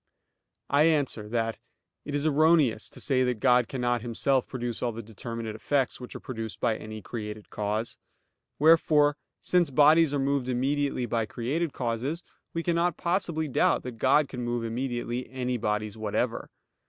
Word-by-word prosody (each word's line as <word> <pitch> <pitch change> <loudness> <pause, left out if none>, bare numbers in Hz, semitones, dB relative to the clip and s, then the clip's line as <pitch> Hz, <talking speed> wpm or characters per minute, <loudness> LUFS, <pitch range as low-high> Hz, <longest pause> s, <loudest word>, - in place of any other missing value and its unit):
I 145 +2 +5
answer 140 -9 +1
that, 115 -1 -1 0.5
It 145 - -3
is 145 +1 -1
erroneous 155 -7 +3
to - - -12
say 130 -3 +2
that 125 -3 -1
God 125 -2 +4
cannot 120 -2 -1
Himself 125 +3 0
produce 120 -3 -4
all 120 - 0
the 115 +1 -7
determinate 115 +1 -6
effects 135 +3 0
which 125 - -9
are - - -5
produced 115 -3 -6
by 110 - +1
any 110 -1 -8
created 105 -2 -7
cause. 105 +2 -2 0.6
Wherefore, 150 -1 +5 0.3
since 175 -4 +2
bodies 150 +3 +5
are 145 - 0
moved 135 -2 0
immediately 135 +1 0
by 115 -2 -1
created 145 +9 -2
causes, 130 +8 -2 0.3
we 165 - -3
cannot 170 0 +1
possibly 170 -3 0
doubt 135 - +2
that 125 -3 -7
God 140 +4 +4
can 125 -2 -6
move 120 -1 -2
immediately 120 +1 -3
any 125 -1 -2
bodies 105 -1 -2
whatever. 110 -2 -2
125 Hz, 160 wpm, -27 LUFS, 115-145 Hz, 0.6 s, I